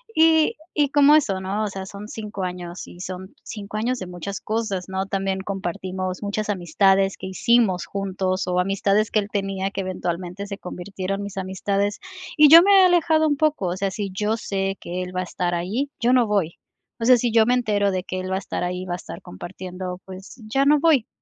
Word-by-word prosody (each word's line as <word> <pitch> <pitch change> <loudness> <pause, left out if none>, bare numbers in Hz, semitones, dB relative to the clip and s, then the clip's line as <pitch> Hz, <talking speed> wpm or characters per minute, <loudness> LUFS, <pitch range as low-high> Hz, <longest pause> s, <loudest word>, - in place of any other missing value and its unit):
Y 320 -1 +4 0.2
y 290 -2 +2
como 290 +1 +6
eso, 200 -11 +1
¿no? 195 +3 -2
O - - -1
sea, 195 -1 -6
son 200 +2 -9
5 210 -3 -6
años 180 -1 -6
y 175 - -12
son 185 +4 -7
5 210 -2 -7
años 245 +3 -1
de 185 - -6
muchas 180 +2 -6
cosas, 215 -4 -2
¿no? 190 0 -2
También 195 -1 -1
compartimos 185 0 -4
muchas 210 +1 -2
amistades 195 +1 +2
que - - -7
hicimos 215 -2 +2
juntos 190 -1 -2
o 180 0 +1
amistades 195 +3 +1
que 215 - +3
él 200 - -3
tenía 195 -1 -2
que 195 - -3
eventualmente 185 +1 -4
se 200 -1 -6
convirtieron 195 +1 -5
mis 200 -1 -6
amistades, 195 +2 -1 0.4
y 300 - +8
yo 330 +2 +11
me 400 - +4
he 370 - +7
alejado 325 -3 +3
un 290 - +2
poco, 305 -11 +1
o 175 +1 -2
sea, 195 0 -1
si 200 -1 -4
yo 210 +3 0
sé 195 -2 -2
que 180 +1 -4
él 180 0 -8
va - - 0
a - - -2
estar 175 0 -2
ahí, 215 +12 -2
yo 240 +2 +3
no 250 -2 +5
voy. 195 -6 0 0.4
O 230 - -2
sea, 250 +1 +7
sí 240 0 0
yo 225 0 +5
me 245 - +3
entero 205 -5 +1
de 185 -1 -2
que 185 0 -4
él 185 0 -5
va 190 - +1
a - - 0
estar 195 - -4
ahí, 180 +1 -3
va 175 - -4
a - - -2
estar - - -9
compartiendo, 180 - -7
pues 190 +4 -10
ya 270 +5 +1
no 295 +1 +5
voy, 290 -7 +3
195 Hz, 220 wpm, -23 LUFS, 185-220 Hz, 0.4 s, yo